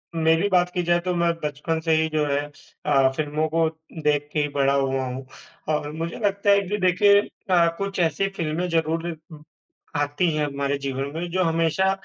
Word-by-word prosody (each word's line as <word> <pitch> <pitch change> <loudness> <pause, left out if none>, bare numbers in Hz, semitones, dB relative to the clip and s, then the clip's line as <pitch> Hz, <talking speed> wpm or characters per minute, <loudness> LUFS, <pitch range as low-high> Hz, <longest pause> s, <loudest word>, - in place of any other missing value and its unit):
मेरी 160 +3 +3
बात 180 -2 +3
की 180 - 0
जाए 175 0 +2
तो 180 - 0
मैं 170 0 +2
बचपन 150 +2 -2
से 165 - +3
ही 160 - +1
जो 155 -1 0
है 140 0 +1 0.4
अ, 135 -3 +4
फ़िल्मों 155 +1 -1
को 165 +1 +2 0.4
देख 145 0 +1
के 150 - +1
ही 145 - +1
बड़ा 140 0 +3
हुआ 135 -1 0
हूँ 130 +1 -6 0.5
और 150 0 -3
मुझे 165 +2 -5
लगता 200 0 +1
है 200 0 +6
कि 210 - 0
देखिए 200 +2 +5 0.3
अ, 175 -2 +5
कुछ 200 -1 -3
ऐसी 170 +3 +1
फ़िल्में 165 +2 -1
ज़रूर 165 0 0 0.2
उम, 150 -1 -12 0.5
आती 145 +4 +1
हैं 150 -1 +1
हमारे 140 0 -2
जीवन 135 0 -3
में 175 +2 -3
जो 185 +1 +1
हमेशा 165 +3 +2
160 Hz, 195 wpm, -24 LUFS, 145-175 Hz, 0.5 s, है